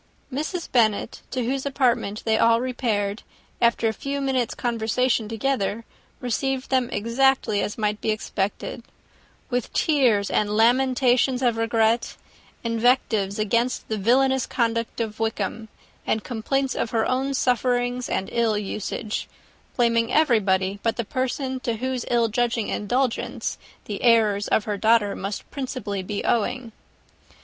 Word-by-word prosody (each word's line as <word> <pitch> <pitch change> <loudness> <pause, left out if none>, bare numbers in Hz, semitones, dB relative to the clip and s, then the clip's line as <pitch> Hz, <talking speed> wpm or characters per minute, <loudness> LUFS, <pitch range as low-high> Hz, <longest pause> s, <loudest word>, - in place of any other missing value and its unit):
Mrs. 310 +5 -3
Bennet, 220 -1 +1
to 255 -2 -2
whose 265 +2 -1
apartment 250 -7 0
they 220 -1 +3
all 230 +1 +4
repaired, 225 -5 -1 0.4
after 235 -1 +3
a 220 - 0
few 280 +5 -4
minutes' 265 -4 0
conversation 230 -1 0
together, 225 -2 -1 0.3
received 265 +2 -2
them 255 -2 +2
exactly 235 -1 +1
as 210 - -3
might 210 -1 -1
be - - -1
expected; 215 0 -2 0.7
with 245 -2 -1
tears 245 -10 +2
and 210 0 +1
lamentations 250 +2 +3
of 240 -2 +3
regret, 225 0 +1 0.5
invectives 230 -4 +1
against 230 +4 0
the 220 - -1
villainous 265 +5 +3
conduct 230 -2 -1
of 220 -2 -3
Wickham, 220 0 -2 0.4
and 220 - 0
complaints 260 +3 -1
of - - -2
her 225 -1 +1
own 270 +2 0
sufferings 245 0 0
and 190 - -1
ill 230 -3 +1
usage; 210 +1 -4 0.5
blaming 230 -1 +2
everybody 200 -9 +2
but 230 - 0
the 235 - -3
person 260 +2 -2
to 235 -2 -2
whose 255 +1 -3
ill 235 -1 +3
judging 230 0 0
indulgence 245 +4 -1 0.3
the 205 -2 -5
errors 215 -4 +3
of 215 - +2
her 205 -1 -3
daughter 215 -1 +3
must 195 +1 -4
be - - -30
principally 205 -7 -4
owing. 240 +1 0
230 Hz, 135 wpm, -24 LUFS, 215-255 Hz, 0.7 s, all